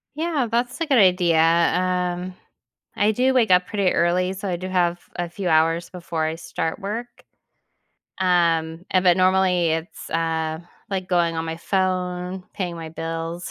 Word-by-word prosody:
Yeah, 310 Hz, -5 st, -1 dB
that's 245 Hz, +4 st, -1 dB
a -, -, +2 dB
good 280 Hz, -4 st, +3 dB
idea. 180 Hz, -5 st, +4 dB
Um, 180 Hz, +2 st, +1 dB, 0.6 s
I 210 Hz, +1 st, +3 dB
do 255 Hz, +4 st, +2 dB
wake 240 Hz, -6 st, +2 dB
up 180 Hz, 0 st, +5 dB
pretty 200 Hz, -4 st, +1 dB
early, 180 Hz, +2 st, +1 dB
so 195 Hz, +1 st, -5 dB
I 180 Hz, -, -1 dB
do 185 Hz, +2 st, -6 dB
have 175 Hz, -2 st, +1 dB, 0.2 s
a 175 Hz, 0 st, -2 dB
few 180 Hz, +2 st, -4 dB
hours 165 Hz, +1 st, +2 dB
before 170 Hz, -3 st, -3 dB
I 160 Hz, 0 st, -1 dB
start 165 Hz, 0 st, -4 dB
work. 215 Hz, +5 st, -4 dB, 1.1 s
Um, 170 Hz, -2 st, +1 dB
and 185 Hz, -, +3 dB
but, 175 Hz, -1 st, +5 dB
normally, 185 Hz, -2 st, +3 dB
it's, 160 Hz, +2 st, -4 dB
uh, 160 Hz, -1 st, -1 dB, 0.3 s
like 185 Hz, -2 st, -3 dB
going 170 Hz, -2 st, +1 dB
on 160 Hz, -, -2 dB
my 160 Hz, 0 st, -4 dB
phone, 180 Hz, 0 st, -2 dB
paying 175 Hz, -3 st, -3 dB
my 165 Hz, -1 st, -7 dB
bills, 165 Hz, +1 st, -5 dB
180 Hz, 165 wpm, -23 LUFS, 165-190 Hz, 1.1 s, up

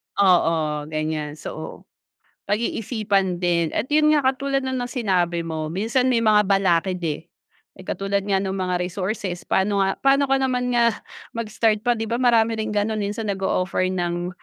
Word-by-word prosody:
Oo 165 Hz, -6 st, +2 dB
ganyan 155 Hz, -1 st, -3 dB
so 155 Hz, +1 st, -8 dB, 0.7 s
pag-iisipan 205 Hz, -3 st, 0 dB
din 170 Hz, -2 st, +1 dB
at 220 Hz, -, 0 dB
yun 305 Hz, 0 st, +5 dB
nga 290 Hz, -3 st, +2 dB
katulad 275 Hz, 0 st, -2 dB
ng 260 Hz, -1 st, -2 dB
sinabi 180 Hz, -8 st, 0 dB
mo 160 Hz, -1 st, -4 dB
minsan 225 Hz, +9 st, 0 dB
may 230 Hz, -2 st, +2 dB
mga 210 Hz, -1 st, +5 dB
balakid 185 Hz, -2 st, +2 dB
eh. 155 Hz, 0 st, -2 dB, 0.5 s
Katulad 195 Hz, +1 st, -2 dB
nga 195 Hz, -, +3 dB
ng 190 Hz, 0 st, -1 dB
mga 185 Hz, -2 st, -1 dB
resources 185 Hz, -1 st, -4 dB
paano 200 Hz, +1 st, +1 dB
nga 195 Hz, 0 st, +1 dB
paano 275 Hz, 0 st, +3 dB
ko 270 Hz, -, +3 dB
naman 250 Hz, -2 st, 0 dB
nga 235 Hz, -1 st, +4 dB, 0.4 s
mag-start 220 Hz, -1 st, 0 dB
pa 240 Hz, +1 st, +1 dB
di 225 Hz, -, -3 dB
ba 235 Hz, +3 st, -2 dB
marami 230 Hz, -2 st, +4 dB
rin 220 Hz, 0 st, -2 dB
ganun 210 Hz, +1 st, -1 dB
minsan 205 Hz, +1 st, -2 dB
nag-o-offer 185 Hz, -1 st, 0 dB
ng 175 Hz, -1 st, -2 dB
200 Hz, 160 wpm, -23 LUFS, 175-230 Hz, 0.7 s, yun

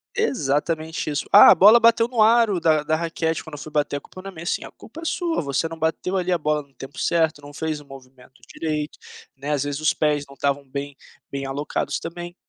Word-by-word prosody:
Exatamente 160 Hz, -, -1 dB
isso. 145 Hz, -, -2 dB
"Ah, -, -, +10 dB
a -, -, +7 dB
bola 215 Hz, +5 st, +7 dB
bateu 230 Hz, 0 st, +4 dB
no 240 Hz, -3 st, 0 dB
aro 220 Hz, -4 st, +4 dB
da 155 Hz, -2 st, +2 dB
da 155 Hz, +1 st, 0 dB
raquete 165 Hz, -1 st, -2 dB
quando 160 Hz, -, -12 dB
eu -, -, -6 dB
fui 155 Hz, -, -9 dB
bater, 145 Hz, -1 st, 0 dB
a 145 Hz, -, -4 dB
culpa 185 Hz, -, -12 dB
na 195 Hz, -, -8 dB
minha". 170 Hz, -3 st, -10 dB
Sim, -, -, -2 dB
a -, -, -11 dB
culpa 305 Hz, +9 st, -13 dB
é 330 Hz, -, -8 dB
sua, 335 Hz, 0 st, -1 dB
você 140 Hz, +3 st, -1 dB
não 165 Hz, 0 st, -9 dB
bateu 160 Hz, +4 st, -1 dB
ali 180 Hz, 0 st, 0 dB
a -, -, +2 dB
bola 150 Hz, -1 st, -1 dB
no 140 Hz, -1 st, -28 dB
tempo 135 Hz, +1 st, -10 dB
certo, 160 Hz, -3 st, +1 dB
não 145 Hz, 0 st, -12 dB
fez 155 Hz, 0 st, -3 dB
o 145 Hz, -, -15 dB
movimento 130 Hz, -1 st, -15 dB, 0.2 s
direito, 150 Hz, -2 st, -3 dB, 0.4 s
né, 140 Hz, +2 st, -4 dB
às 145 Hz, -2 st, 0 dB
vezes 145 Hz, 0 st, -4 dB
os 155 Hz, -, +2 dB
pés 150 Hz, -2 st, 0 dB
não 140 Hz, -, -14 dB
estavam 140 Hz, 0 st, -1 dB
bem 140 Hz, +1 st, -6 dB, 0.3 s
bem 140 Hz, 0 st, -4 dB
alocados 140 Hz, +2 st, -3 dB
também, 175 Hz, +1 st, -7 dB
155 Hz, 235 wpm, -23 LUFS, 145-175 Hz, 0.4 s, Ah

